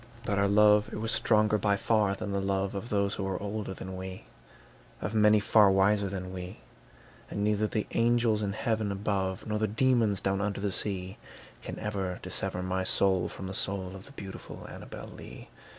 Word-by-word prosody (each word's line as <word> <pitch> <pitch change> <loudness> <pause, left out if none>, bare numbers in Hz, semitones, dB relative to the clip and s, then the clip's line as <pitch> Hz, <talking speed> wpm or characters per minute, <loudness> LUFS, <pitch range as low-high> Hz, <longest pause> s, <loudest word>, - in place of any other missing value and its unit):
But 100 -3 0
our 100 - +3
love 105 +1 +5
it - - -5
was 115 +2 -1
stronger 105 -1 +3
by 100 -1 +2
far 105 -2 +2
than 100 0 -5
the 100 0 0
love 95 0 -1
Of 100 +4 -5
those 100 -1 +1
who 100 - -3
were 95 -1 -2
older 105 0 -4
than 95 0 -7
we, 95 -3 -7 0.8
Of 105 - -4
many 105 -1 +5
far 105 0 +5
wiser 100 +1 +3
than 95 -1 -5
we; 90 0 -7 0.7
And 100 - -3
neither 105 0 +2
the 105 0 -2
angels 115 -2 +2
in 100 -1 -1
heaven 110 -1 -1
above, 95 -2 -2
Nor 105 0 -1
the 110 - +1
demons 115 -2 +2
down 95 0 0
under 105 -1 -2
the 100 0 -1
sea, 95 -1 -1 0.4
Can - - -7
ever 95 -4 -3
dissever 90 - -2
my 95 0 -1
soul 95 -1 +2
from 95 - -8
the 95 - -5
soul 95 -1 -1
Of 95 - -10
the - - -13
beautiful 95 -7 -9
Annabel - - -9
Lee. - - -11
100 Hz, 195 wpm, -29 LUFS, 95-105 Hz, 0.8 s, love